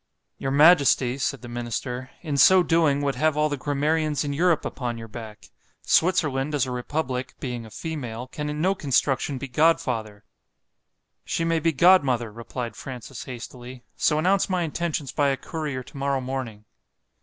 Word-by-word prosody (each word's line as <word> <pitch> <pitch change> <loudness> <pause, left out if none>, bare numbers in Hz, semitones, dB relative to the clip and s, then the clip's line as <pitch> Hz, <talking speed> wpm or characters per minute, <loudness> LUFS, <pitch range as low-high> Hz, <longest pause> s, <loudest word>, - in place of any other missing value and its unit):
——Your 135 - -2
majesty, 140 -3 +5
said 135 -1 -2
the - - -7
minister, 120 +2 -4
in 150 -4 -2
so 180 +7 +7
doing, 160 -5 +2
would 140 -1 +1
have 150 +3 +1
all 150 0 +2
the 145 - -1
grammarians 150 +1 0
in 145 -1 -2
Europe 165 +1 +2
upon 120 -3 -4
your 115 0 -8
back;——Switzerland, 135 - -1
as 140 - +2
a 130 - -5
republic, 130 0 -3
being 120 -3 -5
a - - -12
female, 125 -5 -5
can 150 +3 -5
in 150 0 -4
no 190 +3 +3
construction 140 -4 0
be 135 - -5
godfather.—She 125 0 -3
may 165 -1 +1
be 165 +1 +2
godmother, 135 - +4
replied 115 0 -6
Francis 125 -1 -8
hastily—so 125 +4 -4
announce 190 +6 +2
my 180 -2 +1
intentions 160 -3 -2
by 145 -2 +1
a 135 -1 +1
courier 150 -6 -4
to 140 - -13
morrow 140 0 0
morning. 125 -5 -5
140 Hz, 155 wpm, -25 LUFS, 125-155 Hz, -, so